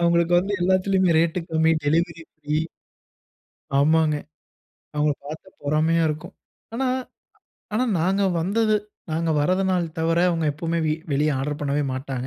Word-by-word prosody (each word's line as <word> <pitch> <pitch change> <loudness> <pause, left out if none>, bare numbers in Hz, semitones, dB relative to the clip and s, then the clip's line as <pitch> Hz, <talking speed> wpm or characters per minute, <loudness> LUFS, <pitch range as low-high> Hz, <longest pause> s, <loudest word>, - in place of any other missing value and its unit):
அவங்களுக்கு 170 0 +2
வந்து 195 +3 -1
எல்லாத்திலுமே 185 -1 +3
ரேட் 165 +2 +1
கம்மி, 160 0 +3
டெலிவரி 165 +2 +1
ஃப்ரீ. 150 -1 -3 1.2
ஆமாங்க. 155 +1 +3 0.8
அவங்கள 150 0 +2
பாத்தா 155 +5 -8
பொறாமையா 155 +3 +2
இருக்கும். 150 0 -5 0.4
ஆனா 260 +3 0 0.9
ஆனா 245 +4 +2 0.2
நாங்க 190 +4 +1 0.2
வந்தது 215 +5 +1 0.4
நாங்க 165 +1 0
வராதநாள் 185 +2 +1
தவர 165 +1 +1
அவங்க 165 -2 0
எப்பவுமே 165 +3 -2
வி 155 - +2 0.2
வெளியே 150 +2 +2
ஆடர் 145 +2 -3
பண்ணவே 145 0 0
மாட்டாங்க. 130 -1 -4
165 Hz, 125 wpm, -23 LUFS, 150-180 Hz, 1.2 s, எல்லாத்திலுமே